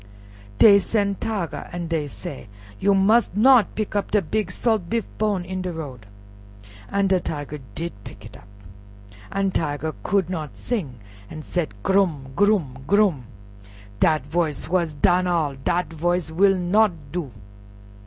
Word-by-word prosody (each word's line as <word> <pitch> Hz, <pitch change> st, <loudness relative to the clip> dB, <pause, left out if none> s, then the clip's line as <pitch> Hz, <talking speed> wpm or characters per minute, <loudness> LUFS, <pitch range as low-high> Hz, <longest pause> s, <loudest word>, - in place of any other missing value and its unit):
Dey 200 Hz, -2 st, +8 dB
sen' 200 Hz, -1 st, 0 dB
Tiger, 205 Hz, -7 st, -3 dB
an' 175 Hz, 0 st, -4 dB
dey 160 Hz, -3 st, -1 dB
said, 140 Hz, -2 st, -8 dB, 0.3 s
"You 200 Hz, -1 st, +3 dB
must 205 Hz, +1 st, +3 dB
not 250 Hz, 0 st, +5 dB
pick 215 Hz, -1 st, -3 dB
up 205 Hz, +1 st, -1 dB
a 210 Hz, -, +4 dB
big 215 Hz, -4 st, -1 dB
salt 210 Hz, -2 st, 0 dB
beef 230 Hz, 0 st, 0 dB
bone 205 Hz, -4 st, 0 dB
in 185 Hz, +1 st, -4 dB
de 185 Hz, -1 st, -3 dB
road." 135 Hz, -10 st, -8 dB, 0.8 s
An' 200 Hz, 0 st, +1 dB
de 190 Hz, -1 st, +3 dB
Tiger 150 Hz, -3 st, -5 dB, 0.2 s
did 170 Hz, +1 st, -3 dB
pick -, -, -11 dB
it -, -, -12 dB
up, 100 Hz, -, -15 dB, 0.8 s
an' 195 Hz, 0 st, 0 dB
Tiger 155 Hz, -2 st, -2 dB
could 195 Hz, -3 st, +1 dB
not 160 Hz, -5 st, -5 dB
sing, 185 Hz, -, -3 dB, 0.3 s
an' 155 Hz, -, -8 dB
said, 160 Hz, -, -3 dB
"Grum! 170 Hz, -9 st, +1 dB
grum! 175 Hz, -9 st, +2 dB
grum!" 195 Hz, -, +2 dB, 0.7 s
"Dat 155 Hz, -4 st, +2 dB
voice 155 Hz, 0 st, -1 dB
is -, -, -8 dB
wuss 170 Hz, -3 st, +1 dB
dan 180 Hz, +5 st, +3 dB
all, 165 Hz, -5 st, +1 dB
dat 155 Hz, +5 st, -2 dB
voice 175 Hz, +1 st, -1 dB
will 195 Hz, +3 st, +4 dB
not 200 Hz, +4 st, +3 dB, 0.2 s
do." 175 Hz, -5 st, -3 dB
180 Hz, 155 wpm, -23 LUFS, 155-200 Hz, 0.8 s, Dey